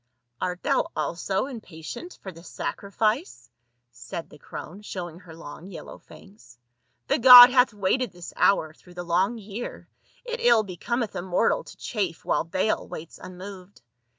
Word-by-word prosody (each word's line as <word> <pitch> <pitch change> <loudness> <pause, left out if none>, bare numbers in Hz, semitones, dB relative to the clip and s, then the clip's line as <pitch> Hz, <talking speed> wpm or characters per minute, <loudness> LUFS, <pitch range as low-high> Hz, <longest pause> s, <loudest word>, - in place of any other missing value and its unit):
"Art 180 0 -3
thou 275 +2 +1
also 190 +4 -1
impatient 240 - -9
for 190 - -6
the 165 -1 -14
sacrifice?" 215 - -3 0.4
said 125 +7 -8
the 150 - -14
crone, 180 +8 -9
showing 175 -5 -7
her 175 -4 -13
long 165 +2 -10
yellow 180 - -10
fangs; 195 - -17 0.5
"the - - +1
god 245 0 +11
hath 250 -1 +4
waited 210 +5 0
this 175 -1 -10
hour 160 -6 +2
through 175 +2 -19
the 175 - -5
long 185 +7 +1
year; 215 +2 -7 0.4
it 480 0 -4
ill 235 -2 +5
be 185 -3 -8
cometh 235 +4 -2
a - - -2
mortal 190 - +1
to - - -13
chafe 195 -8 -3
while - - +1
Baal 185 +6 -1
waits 160 +1 -9
unmoved. 185 -1 -11
190 Hz, 155 wpm, -25 LUFS, 170-230 Hz, 0.5 s, god